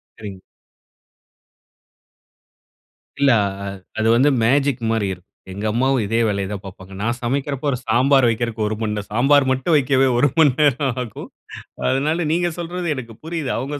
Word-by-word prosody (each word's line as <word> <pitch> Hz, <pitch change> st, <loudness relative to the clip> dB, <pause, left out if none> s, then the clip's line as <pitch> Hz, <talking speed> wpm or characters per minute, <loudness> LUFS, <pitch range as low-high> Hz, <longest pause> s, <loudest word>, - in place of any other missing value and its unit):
சரிங்க. 100 Hz, -3 st, -9 dB, 2.8 s
இல்ல 140 Hz, -2 st, +4 dB
அ -, -, -1 dB, 0.2 s
அ -, -, -4 dB, 0.3 s
அது 110 Hz, -, +1 dB
வந்து 130 Hz, +5 st, +4 dB
மேஜிக் 135 Hz, +1 st, +2 dB
மாரி 110 Hz, -3 st, 0 dB
இருக்கும். 90 Hz, 0 st, -14 dB, 0.3 s
எங்க 100 Hz, +3 st, -5 dB
அம்மாவும் 130 Hz, +2 st, +1 dB
இதே 115 Hz, +3 st, 0 dB
வேலைய 100 Hz, -2 st, -1 dB
தான் 100 Hz, -1 st, -6 dB
பார்ப்பாங்க. 95 Hz, 0 st, -11 dB
நான் 120 Hz, +3 st, -1 dB
சமைக்கிறபோ 140 Hz, +3 st, -2 dB
ஒரு 125 Hz, -, -1 dB
சாம்பார் 130 Hz, +2 st, +4 dB
வைப்கற்கு 115 Hz, 0 st, -2 dB
1 110 Hz, -, -2 dB
மணி 105 Hz, -1 st, -1 dB
நேரம் 105 Hz, -1 st, -6 dB
சாம்பார் 135 Hz, +4 st, +4 dB
மட்டும் 130 Hz, +5 st, +1 dB
வைக்கவே 135 Hz, -1 st, +2 dB
1 145 Hz, +4 st, +3 dB
மணி 150 Hz, -4 st, +6 dB
நேரம் 140 Hz, -2 st, +2 dB
ஆகும். 115 Hz, -, -9 dB, 0.6 s
அதனால 155 Hz, +6 st, 0 dB
நீங்க 175 Hz, +1 st, +1 dB
சொல்றது 175 Hz, +1 st, -4 dB
எனக்கு 115 Hz, -3 st, -8 dB
புரியுது. 160 Hz, -5 st, -3 dB
அவங்க 140 Hz, +4 st, -4 dB
130 Hz, 155 wpm, -20 LUFS, 110-145 Hz, 2.8 s, மணி